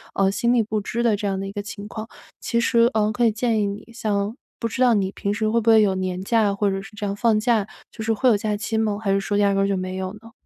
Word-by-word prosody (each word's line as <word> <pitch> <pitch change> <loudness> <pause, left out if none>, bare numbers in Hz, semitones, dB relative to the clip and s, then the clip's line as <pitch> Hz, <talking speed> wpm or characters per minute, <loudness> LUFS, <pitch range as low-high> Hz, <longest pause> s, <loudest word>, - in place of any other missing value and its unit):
呃， 195 -1 +3
心 235 +4 +1
力 240 - +4
不 215 0 -2
支 235 +4 -3
的 230 -3 +3
这 205 - -5
样 195 -1 -1
的 195 - -4
一 - - -6
个 205 0 -4
情 205 0 -8
况。 220 +1 -7 0.3
其 235 - 0
实， 235 0 +3
呃， 215 -1 +2
可 235 +3 +1
以 225 - +4
建 225 0 0
议 - - +1
你 200 +1 -6
像 210 -1 -1 0.2
不 230 - -1
知 230 +3 -4
道 250 -2 +5
你 195 -3 +1
平 200 0 -2
时 215 +1 -1
会 230 +2 +2
不 225 - +1
会 220 -1 +7
有 195 -2 +2
年 185 -1 -3
假， 210 0 +2
或 200 0 +1
者 195 0 -2
是 195 - -13
这 210 0 -4
样 200 0 -2
放 220 0 +2
假， 220 -2 +1 0.2
就 220 - -7
是 225 - 0
会 240 +4 +1
有 230 - +5
假 210 0 -1
期 220 +1 -2
吗？ 215 -2 0
还 200 -3 0
是 195 - +2
说 205 +1 -1
压 200 -1 +3
根 195 0 +2
儿 - - +1
就 200 -1 0
没 185 0 -4
有 185 0 -3
呢？ 225 +2 -14
210 Hz, 335 characters per minute, -23 LUFS, 200-225 Hz, 0.3 s, 会